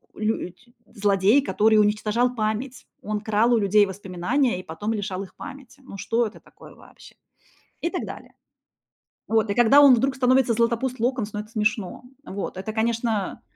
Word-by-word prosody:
лють 215 0 -4 0.2
злодей, 205 +5 +2
который 220 -5 +2
уничтожал 215 +4 +1
память. 220 +4 -3
Он 210 0 -3
крал 220 +3 +1
у - - +4
людей 205 0 +4
воспоминания 195 +5 -1
и - - -9
потом 205 +8 -4
лишал 195 -3 -4
их 190 - -14
памяти. 275 -1 -11
Ну 230 -6 -10
что 230 +4 0
это 215 - -8
такое - - -17
вообще? - - -17 0.7
И 340 - -1
так 365 - -4
далее. - - -10 0.9
Вот. 220 -1 +1
И 200 - -1
когда 240 +4 +6
он 270 -3 +8
вдруг 265 +3 0
становится 255 -2 +3
Златопуст 235 +2 0
Локонс, 235 -3 -1
ну 210 - -4
это 210 +1 -8
смешно. 215 -2 -2 0.2
Вот. 195 -1 -6
Это, 205 +3 -5
конечно, 225 -2 -1
220 Hz, 165 wpm, -24 LUFS, 205-245 Hz, 0.9 s, он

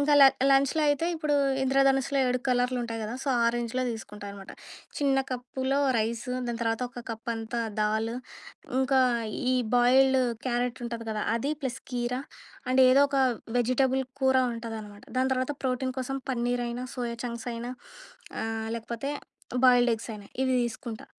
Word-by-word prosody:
ఇంకా 290 +1 +4
ల - - +11 0.3
లంచ్‌లో 275 +3 +3
అయితే, 290 +3 +1
ఇప్పుడు 305 -2 0 0.3
ఇంద్రధనుస్సులో 270 +1 +3
7 250 0 +1
కలర్‌లుంటాయి 245 -2 0
కదా! 225 +3 -4
సో, 280 - -3
ఆ - - +4
రేంజ్‌లో 240 +2 -1
తీసుకుంటా 210 -2 -7
అనమాట. 200 -1 -10 0.5
చిన్న 275 -2 +2
కప్పులో 260 +2 -2 0.2
రైస్ 230 +3 -1 0.2
దాని 235 -1 -3
తర్వాత 225 +2 0
ఒక 245 -1 -9
కప్ 225 +1 -5
అంతా 225 +1 -3 0.2
దాల్ 220 +2 +1 0.7
ఇంకా 265 0 +3 0.5
ఈ - - +3 0.2
బాయిల్డ్ 265 +2 +5 0.3
క్యారెట్ 245 0 -1
ఉంటది 230 -1 -5
కదా! 215 -1 -2
అది 280 +6 -1
ప్లస్ 260 -1 -3
కీర 245 0 -1 0.5
అండ్ 260 +1 +5
ఏదో 260 +2 +6
ఒక 275 - 0 0.4
వెజిటబుల్ 260 +2 +2 0.2
కూర 265 0 +4 0.2
ఉంటదనమాట. 220 -3 -7
దాని 260 +1 +2
తర్వాత 255 +3 -1
ప్రోటీన్ 255 0 -1
కోసం 270 +1 -3
పన్నీర్, 245 0 0
అయినా 245 +1 -4
సోయా 235 -1 -3
చంక్స్ 235 0 -4
అయినా, 240 +2 -5 0.7
ఆహ్, 225 0 -3
లేకపోతే 235 +4 -4 0.5
బాయిల్‌డ్ 245 -1 +6
ఎగ్స్ 225 +2 -8
అయినా, 205 -1 -9 0.2
ఇవి 260 -1 +2
తీసుకుంటా. 230 -1 -6
245 Hz, 155 wpm, -28 LUFS, 230-265 Hz, 0.7 s, ల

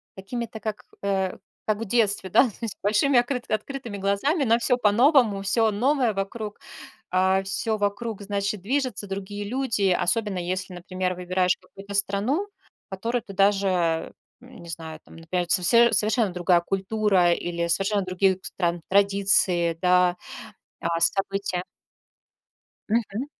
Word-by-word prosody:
какими-то, 220 +3 -6
как, 215 -1 -5 0.2
э, 195 -2 -1 0.3
как 215 -1 +1
в 230 - -5
детстве, 205 -3 +1
да, - - +6
то 210 - -14
есть 225 -4 -4
большими 240 +6 +3
окрыт 245 0 -2
открытыми 230 0 -4
глазами 200 - 0
на 230 -2 +4
всё 245 +1 +2
по-новому, 235 -1 +4
всё 220 +3 +2
новое 250 +2 +1
вокруг. 205 +2 -5 0.5
А, 190 +1 +2
всё 195 +3 -1
вокруг, 205 +1 -2
значит, 200 0 -2
движется, 255 0 -2
другие 200 +1 -5
люди. 230 -6 0
Особенно 195 +2 0
если, 185 +1 -4
например, 185 +1 -3
выбираешь 180 0 0
какую-то 200 +1 -11
страну, 205 - 0 0.4
в - - -82
которую 230 +6 -2
ты 195 - -10
даже, 190 -4 +1 0.3
м, 250 0 -14
не 170 - -11
знаю, 160 -1 -7
там, - - -16
например, 175 +2 -2
совсе 235 +7 +4
совершенно 215 0 +2
другая 175 0 +3
культура 195 -1 +1
или 170 0 -3
совершенно 195 +4 +1
других 185 +1 +1
стран 175 -2 -2
традиции, 195 -4 +3
да, 180 -1 +3 0.6
а 170 0 -1
события. 195 0 0 1.3
Мгм. 225 +2 -1
200 Hz, 140 wpm, -25 LUFS, 185-225 Hz, 1.3 s, да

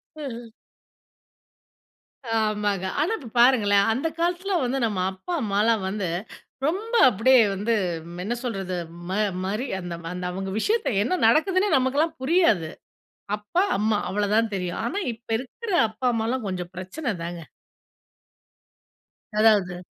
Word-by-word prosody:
அ. 240 -6 -7 1.9
ஆமாங்க. 210 -3 0 0.2
ஆனா 330 - +1
இப்போ 250 -7 -10
பாருங்களேன். 205 -6 +5
அந்த 275 +7 -1
காலத்தில 360 +3 0
வந்து 255 +2 0
நம்ம 205 -4 -2
அப்பா 190 - -7
அம்மாலாம் 215 0 +2
வந்து, 195 -2 -2 0.6
ரொம்ப 425 +8 -3 0.2
அப்டியே 245 +4 +5
வந்து 210 +4 0 0.5
என்ன 235 +4 -2
சொல்றது? 195 -6 -3 0.3
ம - - -3 0.3
மரி 215 +7 -2
அந்த 175 -1 -6 0.2
அந்த 180 0 -5
அவங்க 190 +1 -4
விஷயத்தை 440 - +1
என்ன 365 +9 0
நடக்குதுன்னே 370 - +3
நமக்கெல்லாம் 290 +5 +1
புரியாது. 260 - +3 0.7
அப்பா 210 - 0
அம்மா 210 +1 +1
அவ்வளோதான் 210 +2 +1
தெரியும். 180 -2 -3
ஆனா, 390 +11 -2
இப்ப 230 +1 -20
இருக்கிற 345 - -8 0.2
அப்பா 220 +4 -7
அம்மாலாம் 230 +1 -1
கொஞ்சம் 180 -2 -4
பிரச்சனை 205 - -4
தாங்க. 170 0 -5 2.0
அதாவது. 205 -5 +4
225 Hz, 120 wpm, -25 LUFS, 200-275 Hz, 2.0 s, பாருங்களேன்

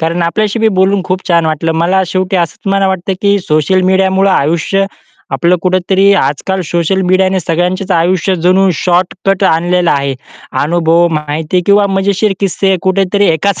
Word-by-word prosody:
कारण 165 +2 -1
आपल्याशी 210 +6 -1
बी 225 0 +2
बोलून 190 0 +2
खूप 185 0 -2
छान 170 -2 +2
वाटलं 160 +1 -1
मला 175 +4 +1
शेवटी 185 +2 -1
असंच 170 +2 -3
मला 195 -1 +1
वाटतं 190 0 -2
की 200 0 +2
सोशल 155 +3 +1
मीडियामुळं 190 +1 +2
आयुष्य 170 +5 0 0.5
आपलं 175 +1 +2
कुठेतरी 185 +2 +2
आजकाल 190 +3 -1
सोशल 170 +3 -1
मीडियाने 185 +1 +1
सगळ्यांचेच 180 +4 -2
आयुष्य 185 +2 +1
जणू 190 +2 +3
शॉर्टकट 185 +3 -1
आणलेलं 175 +1 +1
आहे. 140 -1 -1 0.5
अनुभव, 170 +2 +2
माहिती 155 +3 -2
किंवा 200 0 +4
मजेशीर 195 +1 0
किस्से 195 0 0
कुठेतरी 195 +1 +1
एकाच 185 +5 0
185 Hz, 150 wpm, -12 LUFS, 170-195 Hz, 0.5 s, किंवा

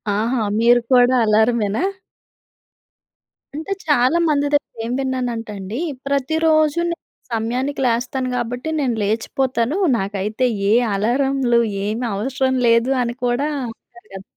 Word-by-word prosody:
ఆహా! 230 +3 0 0.2
మీరు 240 +1 +5
కూడా 250 0 +5
అలార‌మేనా? 220 0 +2 1.7
అంటే, 315 +6 -6 0.2
చాలా 285 +1 +3
మంది 290 -1 +1
దగ్గర 290 - 0
ఏం 235 - -3
విన్నానంటండి, 230 -6 -3 0.3
ప్రతిరోజు‌నే 315 +4 +1 0.4
సమయానికి 250 +5 -2
లేస్తాను. 250 +2 -1
గాబట్టి, 245 +4 -3
నేను 255 -5 0
లేచిపోతాను. 235 - -1 0.2
నాకైతే 205 +4 -2 0.3
ఏ - - +5 0.2
అలారంలు, 245 +3 +1 0.3
ఏమి 220 +4 -2
అవసరం 260 +4 -1
లేదు 230 +2 +3
అని 235 0 -3
కూడా 245 +4 0 0.2
అంటారు‌ 360 - -14
కదా! 190 - -7
245 Hz, 110 wpm, -20 LUFS, 225-275 Hz, 1.7 s, మీరు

